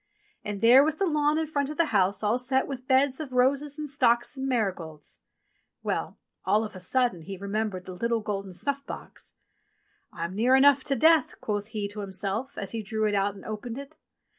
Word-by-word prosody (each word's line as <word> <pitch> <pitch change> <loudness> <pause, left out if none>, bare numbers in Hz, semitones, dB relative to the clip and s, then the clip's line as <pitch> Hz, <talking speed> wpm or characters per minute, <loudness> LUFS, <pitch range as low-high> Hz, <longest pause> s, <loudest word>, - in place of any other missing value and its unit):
And 205 -1 -5
there 245 +4 +7
was 310 +1 0
the 390 - 0
lawn 300 -2 +2
in 320 - 0
front 285 -2 -2
of 300 - -6
the 335 - +4
house 195 0 +2
all 215 +4 +2
set 260 +1 +1
with 260 -2 -7
beds 265 +1 +3
of 290 -5 -6
roses 275 +4 +2
and 305 -1 -4
stocks 240 -2 +2
and 270 0 -3
marigolds! 185 - -3 0.6
Well! - - -3 0.3
all 210 +4 +2
of 210 - -9
a - - -7
sudden 235 -1 +1
he 195 +4 -7
remembered 200 -1 -3
the 185 - -7
little 230 +4 -1
golden 200 -2 -4
snuff 280 +8 -2
box. - - -9 0.8
"I'm 170 +1 -5
near 240 +6 +3
enough 270 0 +5
to 275 - +1
death," 315 +2 +3
quoth 205 -1 -3
he 215 -2 -3
to 205 +1 -7
himself, 200 +5 -3
as 200 - -3
he 225 - -3
drew 215 +1 -1
it 210 - -1
out 200 0 +1
and 195 - -13
opened 220 +3 -5
it. 280 +3 -9
230 Hz, 205 wpm, -27 LUFS, 200-275 Hz, 0.8 s, there